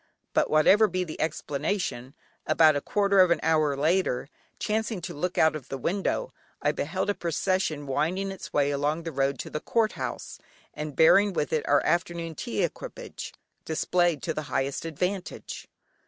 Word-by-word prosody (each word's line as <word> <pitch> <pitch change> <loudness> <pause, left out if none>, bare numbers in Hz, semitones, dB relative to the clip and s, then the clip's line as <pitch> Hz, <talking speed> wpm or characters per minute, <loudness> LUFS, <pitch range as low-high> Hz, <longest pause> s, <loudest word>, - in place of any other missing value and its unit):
But - - +2
whatever 195 +8 +5
be 185 -1 -1
the 160 -3 -6
explanation, 150 -3 -2 0.3
about 155 -2 +5
a 145 - 0
quarter 200 +2 +2
of 185 -1 +7
an 170 - +3
hour 155 -3 +2
later, 155 -3 +1 0.3
chancing 220 -1 -1
to 175 0 -5
look 180 +4 -3
out 160 0 +4
of 145 -5 -8
the 135 - -3
window, 195 - -1 0.3
I - - +2
beheld 205 - -1
a - - -1
procession 170 -3 -1
winding 165 +8 -1
its 195 - -8
way 145 0 +2
along 145 +3 -1
the 165 - -4
road 135 -1 0
to - - -9
the 150 - -2
Court 225 +5 +1
House, - - -6 0.3
and 150 -2 -5
bearing 195 +5 +6
with 150 - -1
it 155 - 0
our 145 0 +3
afternoon 170 -1 0
tea 115 -7 -2
equipage - - -5 0.3
displayed 175 +1 +1
to 160 - -1
the 155 - -3
highest 135 +3 -1
advantage. 180 +4 -4
160 Hz, 170 wpm, -27 LUFS, 145-185 Hz, 0.3 s, of